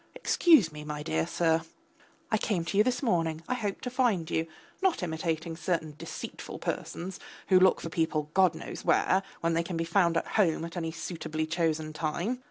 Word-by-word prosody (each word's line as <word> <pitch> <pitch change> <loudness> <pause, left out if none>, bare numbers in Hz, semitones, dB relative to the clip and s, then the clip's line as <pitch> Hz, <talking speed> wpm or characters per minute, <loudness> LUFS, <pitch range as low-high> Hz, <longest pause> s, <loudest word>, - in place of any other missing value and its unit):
Excuse 320 - +5
me, 150 0 -8
my 150 0 -5
dear 80 - 0
sir... 165 -1 +2 0.7
I 220 - +3
came 185 -7 -1
to 165 - -3
you - - +8
this 255 +3 0
morning, 165 -8 +1
I 255 - 0
hoped 210 -5 -3
to 250 - -3
find 225 -11 +1
you, 160 0 0 0.3
not 375 - +2
imitating 160 0 -2
certain 165 -2 -2
deceitful - - -7
persons 185 +2 -4 0.3
who 185 -1 +7
look 185 0 +5
for 165 - -4
people, 155 -2 -1
God 185 -4 +4
knows 160 - -7
where, 190 - +3 0.2
when 165 0 +1
they 165 - +2
can 170 0 -4
be 165 - 0
found 170 0 +2
at - - 0
home 165 -6 +1
at 170 - -8
any 165 -2 -2
suitably 160 -1 -4
chosen 160 -1 -1
time. 170 +10 -2
165 Hz, 190 wpm, -29 LUFS, 160-190 Hz, 0.7 s, you